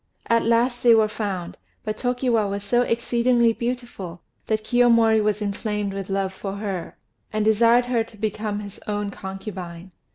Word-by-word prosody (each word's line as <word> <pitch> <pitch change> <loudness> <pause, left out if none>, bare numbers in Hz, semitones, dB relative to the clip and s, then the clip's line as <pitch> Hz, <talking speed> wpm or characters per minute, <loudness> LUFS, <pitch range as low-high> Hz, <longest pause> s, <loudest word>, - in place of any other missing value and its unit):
At 230 0 +3
last 240 +2 +2
they 235 -2 +7
were 220 -1 +4
found; 200 -5 -4 0.3
but 215 0 -3
Tokiwa 245 -4 +1
was 200 0 -3
so 240 +4 +2
exceedingly 235 0 +2
beautiful 235 -8 -5 0.2
that 215 -1 0
Kiyomori 230 -2 +4
was 210 0 0
inflamed 205 0 -2
with 195 -1 -5
love 195 -1 -1
for 195 0 -5
her, 200 -4 -5 0.3
and 215 0 0
desired 230 +3 +5
her 240 -2 +1
to 225 - -16
become 210 0 -2
his 200 -1 -9
own 205 -1 -2
concubine. 190 -3 -7
215 Hz, 160 wpm, -23 LUFS, 200-235 Hz, 0.3 s, they